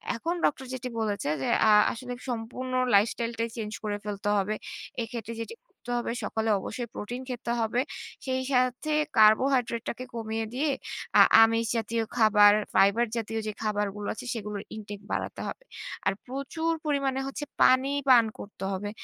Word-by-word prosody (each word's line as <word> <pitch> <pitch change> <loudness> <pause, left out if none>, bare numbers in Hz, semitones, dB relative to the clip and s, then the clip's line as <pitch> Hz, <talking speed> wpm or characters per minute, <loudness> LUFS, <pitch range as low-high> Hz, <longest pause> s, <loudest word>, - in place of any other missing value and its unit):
এখন 330 +9 -2
ডক্টর 265 -2 0
যেটি 255 -1 -4
বলেছে 205 -7 -1
যে, - - -1 0.2
আ - - +6 0.2
আসলে 250 +1 -6 0.2
সম্পূর্ণ 245 +2 -4 0.2
lifestyle 230 +3 +2
টাই 230 - 0
চেঞ্জ 215 -1 -4
করে 205 -1 -2
ফেলতে 205 0 -3
হবে। 200 +2 0 0.5
এক্ষেত্রে 230 -1 -5
যেটি 230 - -6
করতে 245 - -10
হবে 240 - -2
সকালে 220 +1 -1
অবশ্যই 240 +5 -5
প্রোটিন 245 +5 -5
খেতে 245 -1 -3
হবে। 225 +2 +1 0.4
সেই 260 -1 0
সাথে 255 +4 +1 0.3
carbohydrate 235 +2 +4
টাকে 250 - -5
কমিয়ে 225 0 -2
দিয়ে 290 +4 0 0.5
আ - - +11 0.2
আমিষ 225 +1 +4
জাতীয় 225 +1 -1
খাবার, 210 -2 +7 0.2
ফাইবার 200 +5 +4
জাতীয় 225 0 -2
যে, - - -1
খাবারগুলো 210 -1 -2
আছে 225 - -9
সেগুলোর 210 -3 -5
intake 205 -2 -8
বাড়াতে - - -3
হবে। - - -7 0.4
আর - - +3
প্রচুর 275 +6 -2
পরিমাণে 275 -3 0
হচ্ছে 275 +2 -5 0.2
পানি 260 +1 +5 0.2
পান 240 -3 +8
করতে 200 -1 -9
হবে, 195 +2 -3
230 Hz, 160 wpm, -28 LUFS, 210-255 Hz, 0.5 s, আ